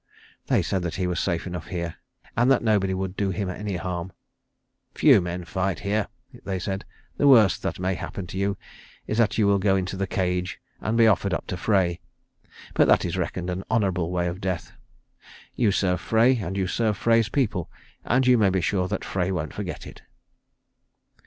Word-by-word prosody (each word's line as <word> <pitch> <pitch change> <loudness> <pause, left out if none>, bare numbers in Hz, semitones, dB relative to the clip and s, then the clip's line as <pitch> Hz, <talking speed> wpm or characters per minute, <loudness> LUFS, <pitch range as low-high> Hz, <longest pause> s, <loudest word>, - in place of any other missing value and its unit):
They - - +2
said 95 - -1
that 85 -2 -3
he 95 - -1
was 90 -1 -1
safe 85 - -1
enough 90 -3 -6
here, 85 -2 -4 0.4
and 120 +2 +3
that 135 -3 +4
nobody 105 -4 +2
would 95 0 -3
do 100 -1 0
him 95 0 -2
any 100 +1 -4
harm. 90 0 -4 0.8
"Few - - +6
men 90 0 -4
fight 95 +4 -2
here," 105 0 0 0.4
they 95 -1 -2
said. 95 +2 -4 0.3
"The 145 - +3
worst 110 -8 +6
that - - -3
may 95 +1 -1
happen 95 +1 -5
to 90 - -7
you 100 0 0 0.5
is 110 - -2
that 110 -3 +2
you 110 - +3
will 100 0 +3
go 95 0 +3
into 95 0 -2
the 95 0 -2
cage 90 0 -1 0.2
and 110 +2 -1
be 115 - +6
offered 100 -2 +3
up - - -4
to - - -4
Frey. 90 -4 +1 0.7
But - - +4
that - - +4
is - - -2
reckoned 90 0 -2
an 90 +2 -4
honourable 95 -6 +1
way 90 -1 0
of 90 +3 -5
death. 95 -2 -3 0.8
You 115 -5 +2
serve 90 -3 +1
Frey, 120 +3 +3
and 95 -3 -4
you 95 - +1
serve 105 +2 0
Frey's 115 -1 +3
people, 105 - -1 0.3
and 130 +2 +2
you 125 -2 +5
may 100 -3 +4
be 95 0 +1
sure 90 +1 0
that - - -3
Frey 95 -1 -1
won't 80 -5 -3
forget - - -5
it." - - -11
95 Hz, 195 wpm, -25 LUFS, 90-105 Hz, 0.8 s, Few